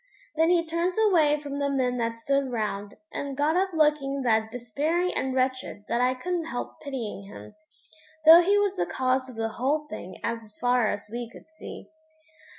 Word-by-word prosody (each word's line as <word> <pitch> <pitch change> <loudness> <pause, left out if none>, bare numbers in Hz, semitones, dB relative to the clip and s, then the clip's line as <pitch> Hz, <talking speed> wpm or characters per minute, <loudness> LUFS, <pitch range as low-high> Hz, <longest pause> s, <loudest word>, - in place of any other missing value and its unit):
Then 320 +1 +3
he 345 -1 +3
turns 335 +2 -1
away 330 -9 +4
from 285 -1 -4
the 280 0 0
men 255 -3 0
that 230 -1 -1
stood 275 +2 0
round, 205 -3 -3 0.2
and 280 -2 -4
got 300 +3 +2
up 380 +1 +2
looking 300 -4 +1
that 220 -2 +2
despairing 295 +10 -1
and 265 -1 -2
wretched 255 -5 -1
that 235 - +1
I 255 +1 +2
couldn't 345 +5 -2
help 245 -6 -6
pitying 240 -8 -5
him, 105 - -11 0.7
though 325 +2 +10
he 400 +4 +3
was 410 -1 +1
the 175 - 0
cause 260 0 0
of 250 - -10
the 225 0 -2
whole 280 +7 -1
thing 185 -3 -8
as 230 -2 -4
far 245 -2 +3
as 205 0 -4
we 240 0 -5
could - - -14
see. 315 - -10
265 Hz, 185 wpm, -26 LUFS, 230-315 Hz, 0.7 s, though